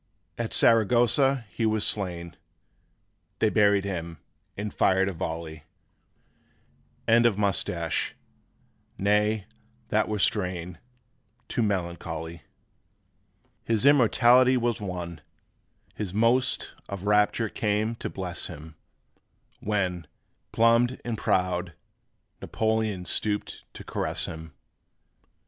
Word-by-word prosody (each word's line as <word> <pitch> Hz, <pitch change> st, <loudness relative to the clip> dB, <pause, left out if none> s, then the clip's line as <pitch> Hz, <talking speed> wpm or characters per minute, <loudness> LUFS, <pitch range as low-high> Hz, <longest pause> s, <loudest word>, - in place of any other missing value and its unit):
') -, -, -45 dB
At -, -, -7 dB
Saragossa 120 Hz, +3 st, +3 dB
he 115 Hz, -, -3 dB
was 110 Hz, -1 st, +1 dB
slain; 85 Hz, -4 st, -1 dB, 1.0 s
They 110 Hz, -, +2 dB
buried 100 Hz, -2 st, +4 dB
him, 85 Hz, -4 st, -5 dB, 0.4 s
and 105 Hz, +1 st, -4 dB
fired 95 Hz, 0 st, +3 dB
a -, -, -5 dB
volley: 80 Hz, -2 st, -5 dB, 1.4 s
End 115 Hz, +1 st, +5 dB
of 105 Hz, -4 st, 0 dB
Moustache. 90 Hz, -5 st, -1 dB, 0.8 s
Nay, 105 Hz, +1 st, +1 dB, 0.4 s
that 110 Hz, 0 st, +2 dB
were 105 Hz, -, -1 dB
strain 90 Hz, -4 st, -1 dB, 0.7 s
Too -, -, -1 dB
melancholy. 85 Hz, -5 st, -3 dB, 1.2 s
His 115 Hz, +1 st, 0 dB
immortality 130 Hz, -1 st, +5 dB
was 120 Hz, -3 st, -1 dB
won, 90 Hz, -4 st, -5 dB, 0.7 s
His 100 Hz, -3 st, -5 dB
most 115 Hz, +4 st, +1 dB, 0.2 s
of 100 Hz, -1 st, -6 dB
rapture 105 Hz, +2 st, +2 dB
came 105 Hz, +2 st, -1 dB
to -, -, -5 dB
bless 90 Hz, -2 st, -4 dB
him, 80 Hz, -1 st, -10 dB, 0.9 s
When, 90 Hz, -5 st, -2 dB, 0.4 s
plumed 115 Hz, +2 st, +3 dB
and 120 Hz, -2 st, -2 dB
proud, 90 Hz, -4 st, -1 dB, 0.7 s
Napoleon 110 Hz, -4 st, -1 dB
Stooped 105 Hz, +4 st, -2 dB
to -, -, -8 dB
caress -, -, -1 dB
him. 80 Hz, -2 st, -8 dB
105 Hz, 100 wpm, -26 LUFS, 90-110 Hz, 1.4 s, End